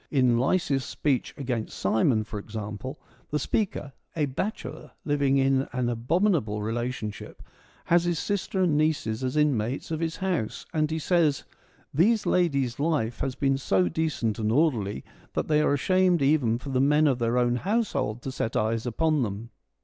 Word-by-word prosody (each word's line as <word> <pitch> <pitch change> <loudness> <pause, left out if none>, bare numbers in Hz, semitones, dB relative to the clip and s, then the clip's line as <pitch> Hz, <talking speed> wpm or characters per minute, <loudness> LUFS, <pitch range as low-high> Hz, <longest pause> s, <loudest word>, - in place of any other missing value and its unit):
In 125 -4 +3
Lysias' 135 -1 +1
speech 135 -2 -1
' - - -35
Against 120 -5 -3
Simon,' 110 +3 +2
for 105 -1 -6
example, 105 +5 -6 0.3
the 150 - 0
speaker, 150 -5 -2 0.2
a 155 -3 +1
bachelor 150 0 -5 0.2
living 140 -2 +2
in 135 0 +2
an 125 -1 0
abominable 120 - +1
relation 120 0 -2
ship, - - -11 0.4
has 170 0 +3
his 175 -1 0
sister 195 +1 -1
and 165 -5 +2
nieces 145 -7 0
as 130 +3 -1
inmates 135 -2 0
of 160 - -1
his 165 -1 -2
house, 185 - -2
and 155 -1 +1
he 160 - -2
says: 160 -3 +2 0.3
' - - -32
These 210 - +3
ladies' 140 -9 +1
life 145 -7 0
has 135 -2 -2
been 135 -1 +1
so 95 -8 +2
decent 130 - -1
and 110 -1 0
orderly 115 - +1 0.3
that - - -1
they 150 -1 +3
are 145 - +3
ashamed 185 +1 +2
even 135 -6 +3
for 135 +3 -8
the 130 -1 +1
men 150 +3 +4
of 135 -4 +2
their 120 +1 +1
own 120 0 +2
household 185 - -1
to 135 - -4
set 115 -3 -3
eyes 110 +2 0
upon 155 +4 +1
them.' 110 +1 -4
135 Hz, 175 wpm, -26 LUFS, 115-160 Hz, 0.4 s, men